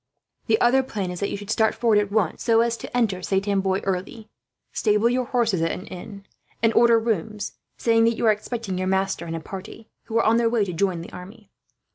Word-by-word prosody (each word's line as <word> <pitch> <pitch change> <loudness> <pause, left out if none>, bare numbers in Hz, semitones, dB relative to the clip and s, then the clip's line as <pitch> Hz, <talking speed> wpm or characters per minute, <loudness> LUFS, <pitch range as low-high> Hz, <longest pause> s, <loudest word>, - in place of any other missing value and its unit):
"The 220 -2 +3
other 255 +3 +4
plan 205 -8 -4
is 180 - -6
that 200 - -1
you - - -3
should 205 +1 -6
start 220 0 +2
forward 225 -3 +3
at 205 -1 -2
once, 205 -6 0
so 230 -1 +4
as 235 0 +1
to 245 - -5
enter 205 -6 +1
Saint 195 +2 -1
Amboise 195 -1 0
early. 195 +4 -4 0.4
Stable 210 +1 +2
your 250 0 0
horse 235 -4 +1
at 175 - 0
an 165 +3 -2
inn; 200 +1 -9 0.4
and 225 0 +4
order 235 0 +5
rooms, 215 -2 -2 0.3
saying 225 -1 +3
that 230 0 +1
you - - -1
are 220 - +6
expecting 210 -2 -4
your 185 - -1
master 190 -2 0
and 165 - -4
a - - -3
party, 195 +6 -9 0.2
who 230 0 -2
are 230 - +3
on 225 +1 +4
their 235 -1 +2
way 225 -3 +1
to 180 - -5
join 175 0 0
the 170 - -11
army. 200 +3 -12
210 Hz, 230 wpm, -24 LUFS, 190-230 Hz, 0.4 s, are